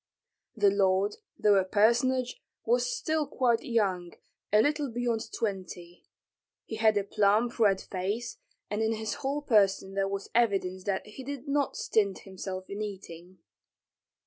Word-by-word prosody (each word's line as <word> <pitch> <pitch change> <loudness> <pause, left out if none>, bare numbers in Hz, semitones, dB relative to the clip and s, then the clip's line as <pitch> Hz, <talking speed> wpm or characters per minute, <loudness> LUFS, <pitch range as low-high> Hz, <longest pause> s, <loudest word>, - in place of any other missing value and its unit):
The 205 -3 +4
lord, 195 +1 +2 0.2
though 205 -1 +4
a 190 - +4
personage, 240 - +2 0.2
was - - +2
still 315 -11 -1
quite 240 -3 +1
young, 190 -7 -1 0.4
a 210 - +5
little 290 +2 +1
beyond 235 -1 -2
twenty. 180 -4 -5 0.6
He 220 - -6
had 220 -1 +4
a 200 - +1
plump, 210 +4 +1
red 200 -4 +4
face, 200 +5 -4 0.3
and 210 +1 -2
in 220 0 +1
his 220 -1 -3
whole 285 +2 -2
person 195 -5 +2
there 195 0 0
was 200 0 -5
evidence 195 -5 +1
that 195 -1 -1
he 215 +5 -10
did 280 +1 -6
not 280 0 0
stint 200 -3 0
himself 190 -1 -6
in 200 +1 -5
eating. 185 -3 -8
210 Hz, 145 wpm, -29 LUFS, 195-240 Hz, 0.6 s, a